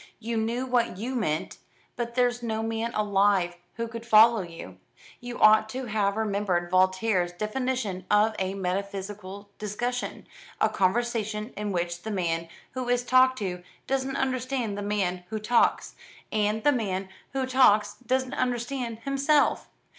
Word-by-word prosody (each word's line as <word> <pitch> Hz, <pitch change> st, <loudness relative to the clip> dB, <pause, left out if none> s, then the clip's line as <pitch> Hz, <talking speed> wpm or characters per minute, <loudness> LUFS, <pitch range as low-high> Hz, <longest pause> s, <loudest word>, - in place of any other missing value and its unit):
You 230 Hz, +1 st, -4 dB
knew 230 Hz, +3 st, -1 dB
what 245 Hz, -6 st, +1 dB
you 240 Hz, +6 st, -4 dB
meant, 180 Hz, -11 st, -2 dB, 0.4 s
but 235 Hz, -1 st, -4 dB
there's 245 Hz, -1 st, +2 dB
no 220 Hz, -1 st, -2 dB
man 225 Hz, +1 st, -2 dB
alive 200 Hz, -4 st, +2 dB, 0.2 s
who 230 Hz, 0 st, -3 dB
could 230 Hz, 0 st, -7 dB
follow 225 Hz, -1 st, +6 dB
you. 165 Hz, -, -9 dB, 0.4 s
You 245 Hz, 0 st, -7 dB
ought 215 Hz, 0 st, +6 dB
to 255 Hz, +3 st, -4 dB
have 210 Hz, -2 st, 0 dB
remembered 200 Hz, -5 st, 0 dB
Voltaire's 185 Hz, 0 st, +2 dB
definition 215 Hz, -1 st, -3 dB
of 210 Hz, +1 st, +4 dB
a 190 Hz, 0 st, -1 dB
metaphysical 200 Hz, +1 st, -4 dB
discussion, 240 Hz, +4 st, -3 dB, 0.3 s
a -, -, +3 dB
conversation 215 Hz, +2 st, -1 dB
in 210 Hz, 0 st, -3 dB
which 175 Hz, -1 st, -2 dB
the 220 Hz, -, -6 dB
man 170 Hz, -4 st, -1 dB, 0.2 s
who 255 Hz, -1 st, -4 dB
is 245 Hz, 0 st, +2 dB
talked 255 Hz, +1 st, +4 dB
to 180 Hz, -5 st, -3 dB, 0.2 s
doesn't 270 Hz, 0 st, -1 dB
understand 255 Hz, -4 st, -1 dB
the 205 Hz, -, -4 dB
man 195 Hz, -3 st, -1 dB
who 220 Hz, -, -3 dB
talks, 225 Hz, +3 st, +2 dB, 0.4 s
and 215 Hz, 0 st, 0 dB
the 290 Hz, -, +5 dB
man 195 Hz, -7 st, -2 dB, 0.3 s
who 265 Hz, -1 st, 0 dB
talks 215 Hz, -6 st, +4 dB
doesn't 260 Hz, +1 st, 0 dB
understand 245 Hz, -1 st, -2 dB
himself. 275 Hz, +3 st, +2 dB
220 Hz, 145 wpm, -27 LUFS, 195-245 Hz, 0.4 s, follow